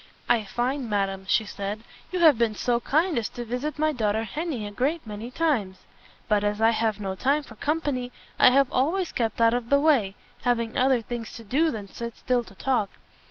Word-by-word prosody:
"I 225 Hz, -3 st, +2 dB
find, 245 Hz, +4 st, -2 dB
madam," 195 Hz, -2 st, -1 dB
she 220 Hz, -, +3 dB
said, 205 Hz, +1 st, -5 dB, 0.3 s
"you 365 Hz, -1 st, -1 dB
have 315 Hz, -4 st, +7 dB
been 225 Hz, -2 st, +1 dB
so 240 Hz, +2 st, +1 dB
kind 310 Hz, +3 st, +1 dB
as 220 Hz, -, -3 dB
to 240 Hz, -, -7 dB
visit 250 Hz, +6 st, -3 dB
my 310 Hz, +1 st, +2 dB
daughter 220 Hz, -4 st, 0 dB
Henny 270 Hz, -, -4 dB
a 205 Hz, -, -6 dB
great 275 Hz, +8 st, -1 dB
many 215 Hz, +2 st, -6 dB
times, 250 Hz, -, -1 dB, 0.4 s
but 210 Hz, -1 st, +2 dB
as 205 Hz, 0 st, 0 dB
I 225 Hz, +1 st, +5 dB
have 220 Hz, -2 st, 0 dB
no 195 Hz, -2 st, -3 dB
time 275 Hz, +9 st, +1 dB
for 240 Hz, -, -12 dB
company, 285 Hz, -4 st, -1 dB, 0.3 s
I -, -, +8 dB
have 270 Hz, +1 st, +3 dB
always 335 Hz, +8 st, +1 dB
kept 225 Hz, -2 st, -2 dB
out 230 Hz, 0 st, +5 dB
of 240 Hz, -1 st, -2 dB
the 280 Hz, -, +5 dB
way, 265 Hz, -11 st, +3 dB, 0.3 s
having 235 Hz, -2 st, 0 dB
other 255 Hz, -2 st, +3 dB
things 235 Hz, 0 st, -6 dB
to 230 Hz, -, -9 dB
do 290 Hz, +10 st, +2 dB
than 215 Hz, -7 st, -5 dB
sit 235 Hz, +3 st, -7 dB
still 250 Hz, -2 st, 0 dB
to 200 Hz, -, -15 dB
talk. 235 Hz, -3 st, 0 dB
240 Hz, 205 wpm, -26 LUFS, 215-275 Hz, 0.4 s, I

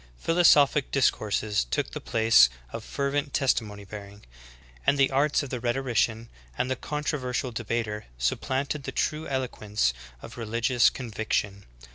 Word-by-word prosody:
Philosophic 150 Hz, -, +4 dB
discourses 110 Hz, -, +1 dB
took -, -, -2 dB
the -, -, -6 dB
place 115 Hz, -, +5 dB, 0.2 s
of -, -, -5 dB
fervent 140 Hz, 0 st, -2 dB
testimony 105 Hz, -6 st, 0 dB
bearing, 100 Hz, 0 st, -10 dB, 0.6 s
and 140 Hz, -, +3 dB
the 135 Hz, -1 st, +3 dB
arts 140 Hz, +2 st, +2 dB
of 140 Hz, -, -7 dB
the 125 Hz, -, -3 dB
rhetorician 120 Hz, -2 st, 0 dB, 0.3 s
and 130 Hz, -1 st, -1 dB
con 150 Hz, 0 st, -3 dB
troversial 125 Hz, -4 st, -2 dB
debater 115 Hz, -2 st, -3 dB
supplanted 135 Hz, -, -1 dB
the -, -, -5 dB
true 155 Hz, +1 st, -1 dB
eloquence 110 Hz, -, -1 dB, 0.3 s
of 115 Hz, -, -10 dB
relig 115 Hz, +2 st, -1 dB
ious 125 Hz, -1 st, +5 dB
conviction. 105 Hz, -4 st, -3 dB
120 Hz, 135 wpm, -27 LUFS, 105-135 Hz, 0.6 s, place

